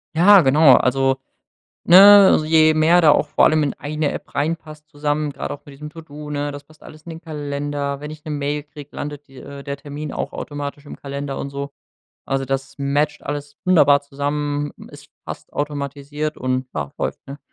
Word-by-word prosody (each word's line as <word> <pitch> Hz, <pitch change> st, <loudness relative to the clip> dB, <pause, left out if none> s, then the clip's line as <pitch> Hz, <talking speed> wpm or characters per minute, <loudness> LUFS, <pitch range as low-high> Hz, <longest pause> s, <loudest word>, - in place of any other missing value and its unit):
Ja, 195 Hz, +4 st, +7 dB
genau. 140 Hz, -1 st, +6 dB
Also, 135 Hz, +1 st, +2 dB, 0.7 s
ne, 195 Hz, 0 st, +8 dB
je 155 Hz, 0 st, +4 dB
mehr 160 Hz, +3 st, +4 dB
da 155 Hz, -3 st, +6 dB
auch -, -, +2 dB
vor -, -, +3 dB
allem 155 Hz, 0 st, +3 dB
in 140 Hz, -, -1 dB
1 150 Hz, 0 st, -3 dB
App -, -, -8 dB
reinpasst 155 Hz, 0 st, -4 dB
zusammen, 145 Hz, 0 st, -2 dB
grad -, -, -6 dB
auch 145 Hz, -, -7 dB
mit 145 Hz, -, -12 dB
diesem 150 Hz, +2 st, -9 dB
To-do, 150 Hz, -2 st, -11 dB
ne? 145 Hz, 0 st, -3 dB
Das 145 Hz, 0 st, -9 dB
passt 155 Hz, +2 st, -21 dB
alles 155 Hz, 0 st, -14 dB
in 170 Hz, -, -9 dB
den 160 Hz, -, -10 dB
Kalender. 145 Hz, -2 st, -4 dB
Wenn 150 Hz, +1 st, -7 dB
ich 155 Hz, +1 st, -12 dB
'ne 155 Hz, -, -5 dB
Mail 145 Hz, 0 st, -2 dB
krieg, 145 Hz, -1 st, -13 dB
landet 145 Hz, 0 st, -7 dB
die 135 Hz, -1 st, -17 dB
äh, 140 Hz, +2 st, -10 dB
der 140 Hz, 0 st, -5 dB
Termin 145 Hz, +1 st, -7 dB
auch -, -, -5 dB
automatisch 145 Hz, 0 st, -6 dB
im -, -, -9 dB
Kalender 140 Hz, 0 st, -6 dB
und 140 Hz, -, -5 dB
so. 140 Hz, 0 st, -6 dB, 0.5 s
Also, 135 Hz, 0 st, -2 dB
das 135 Hz, 0 st, -4 dB
matcht 145 Hz, +2 st, -1 dB
alles 145 Hz, 0 st, -6 dB
wunderbar 145 Hz, -6 st, +5 dB
zusammen, 145 Hz, +1 st, -3 dB, 0.2 s
es -, -, -14 dB, 0.2 s
passt -, -, -9 dB
automatisiert 145 Hz, +1 st, -4 dB
und 130 Hz, 0 st, -2 dB
ja, 75 Hz, -2 st, -4 dB
läuft, -, -, -3 dB
ne? 140 Hz, +1 st, -9 dB
145 Hz, 190 wpm, -20 LUFS, 140-155 Hz, 0.7 s, ne